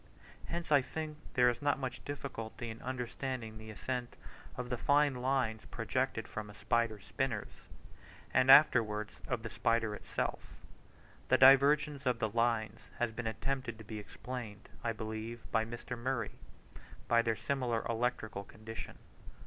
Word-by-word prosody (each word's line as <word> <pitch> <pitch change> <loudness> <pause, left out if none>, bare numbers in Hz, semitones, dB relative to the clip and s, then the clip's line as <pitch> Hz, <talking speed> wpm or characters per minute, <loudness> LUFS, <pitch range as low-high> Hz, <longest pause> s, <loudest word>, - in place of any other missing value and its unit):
Hence 170 -1 -4
I 145 -2 +7
think 155 +2 -5 0.2
there 125 -1 +6
is 120 0 +1
not 145 0 +2
much 130 -2 -4
difficulty 120 -5 -5
in 110 - -10
understanding 125 -2 -4
the 110 0 -9
ascent 125 +3 -4 0.4
of 125 0 -4
the 125 - 0
fine 145 0 +4
lines 125 -3 0
projected 125 +1 -1
from 105 -1 -6
a 105 - -11
spider's 115 -3 0
spinners, 130 -6 -2 0.8
and 130 0 +4
afterwards 110 -7 +6
of 115 - -2
the 115 - -4
spider 115 -2 +1
itself; - - -4 0.7
the - - +5
divergence 140 +1 +6
of 125 -2 +3
the 110 -1 0
lines 115 -1 +1 0.2
has 120 -1 0
been 115 +1 -4
attempted 130 0 -2
to 110 - -10
be 110 0 -6
explained, 110 -1 -7
I 115 - +1
believe 110 +1 -5
by 110 -1 +2
Mr. 120 +2 -6
Murray, 120 -2 -2 0.8
by 115 0 +5
their 115 -1 +1
similar 120 0 -1
electrical 115 -3 -1
condition. 110 +2 -8
120 Hz, 150 wpm, -34 LUFS, 110-130 Hz, 0.8 s, I